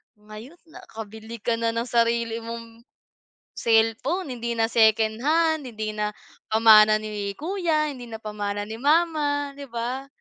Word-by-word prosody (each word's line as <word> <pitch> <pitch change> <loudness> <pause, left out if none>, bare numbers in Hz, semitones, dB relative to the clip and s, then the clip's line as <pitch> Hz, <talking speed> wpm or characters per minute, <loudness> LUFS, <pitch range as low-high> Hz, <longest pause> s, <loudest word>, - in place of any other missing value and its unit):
ngayon 215 +7 -12 0.2
nakabili 220 -3 -10
ka 230 -1 0
na 230 0 -1
ng 230 - 0
sarili 230 -1 +1
mong 230 0 -9 0.7
cellphone. 230 +9 +1
Hindi 235 -1 -3
na 225 - +2
secondhand, 240 +8 +2
hindi 215 -2 -4
na 210 0 -3 0.3
pamana 215 -1 +7
ni 210 -2 -4
kuya, 320 -3 0
hindi 250 -3 -10
na 225 - -6
pamanan 205 -1 -4
ni 225 - -6
mama, 295 -1 +1
'di 280 - -7
ba? 245 +3 -4
230 Hz, 135 wpm, -24 LUFS, 220-280 Hz, 0.7 s, pamana